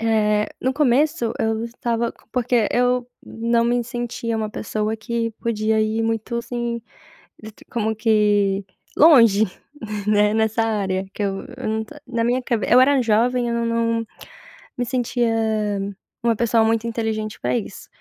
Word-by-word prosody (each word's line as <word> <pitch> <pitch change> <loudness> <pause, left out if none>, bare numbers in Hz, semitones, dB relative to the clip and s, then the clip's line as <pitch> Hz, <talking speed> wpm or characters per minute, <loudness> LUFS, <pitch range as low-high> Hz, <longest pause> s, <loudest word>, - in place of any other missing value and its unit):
Eh, 210 -2 +2
no 260 +1 0
começo 275 -4 +2
eu 220 +1 0
estava 235 0 -2 0.2
porque 245 -3 +1
eu 245 0 +1 0.2
não 230 +1 0
me 240 0 +1
sentia 235 -1 -3
uma 215 -1 -2
pessoa 215 0 -2
que 230 +1 -2
podia 220 -1 0
ir 220 +1 0
muito, 225 +1 -2
assim, 235 0 -3 0.6
d 220 - -8
t - - -19
como 220 -2 -1
que, 205 -3 +2 0.3
longe, 230 -10 +7 0.6
né, 210 0 +3
nessa 220 +1 +1
área, 195 -4 -1
que - - -4
eu 195 -1 -3
eu 255 -3 -4
não 220 0 -1
to 220 - -14
na 230 -2 -1
minha 245 +2 +1
cabe 235 -3 -1
eu 245 - +7
era 270 +1 +5
jovem, 240 +2 +2
eu 235 - -1
não 235 0 0
não 230 0 0 0.7
me 245 - -1
sentia 245 -1 0 0.9
uma 230 -1 +2
pessoa 230 0 +2
muito 225 0 +1
inteligente 220 -2 -3
pra 125 0 0
isso, - - -7
230 Hz, 155 wpm, -22 LUFS, 215-240 Hz, 0.9 s, longe